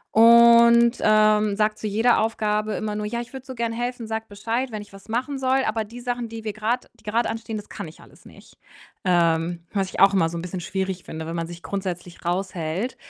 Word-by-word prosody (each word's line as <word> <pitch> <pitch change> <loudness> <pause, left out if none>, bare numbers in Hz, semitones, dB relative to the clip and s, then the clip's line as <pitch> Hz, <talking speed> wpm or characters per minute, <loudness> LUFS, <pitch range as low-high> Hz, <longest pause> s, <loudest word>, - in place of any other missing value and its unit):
und, 235 +1 +7
ähm, 215 -1 +4
sagt 215 0 0
zu 215 - -3
jeder 225 +4 +3
Aufgabe 215 -1 0
immer 210 -1 -3
nur: 210 0 -3
„Ja, 235 +2 -3
ich 240 - -11
würde 265 0 -8
so 260 - -7
gern 230 -1 -2
helfen, 240 0 -3
sag 220 0 -4
Bescheid, 230 +5 -3
wenn 215 -1 -5
ich 205 - -20
was 195 +2 -15
machen 260 +4 -2
soll, 265 0 +2
aber 215 0 -1
die 240 +3 -11
Sachen, 245 -1 -3
die 225 -1 -8
wir 215 -2 -3
grad 225 +4 -2
die - - -24
grad 225 +3 0
anstehen, 225 -1 -4
das 210 - -9
kann - - -7
ich 155 - -14
alles - - -19
nicht.“ - - -16 0.5
Ähm, 170 -1 +1
was 195 -2 0
ich - - -6
auch 195 0 +6
immer 165 -4 +3
so 170 - -5
'n - - -4
bisschen 180 0 -5
schwierig 190 0 -3
finde, 160 0 -7
wenn 165 - -4
man 165 0 -3
sich 170 0 -10
grundsätzlich 180 -3 -5
raushält 180 +3 -2
215 Hz, 230 wpm, -23 LUFS, 190-235 Hz, 0.5 s, und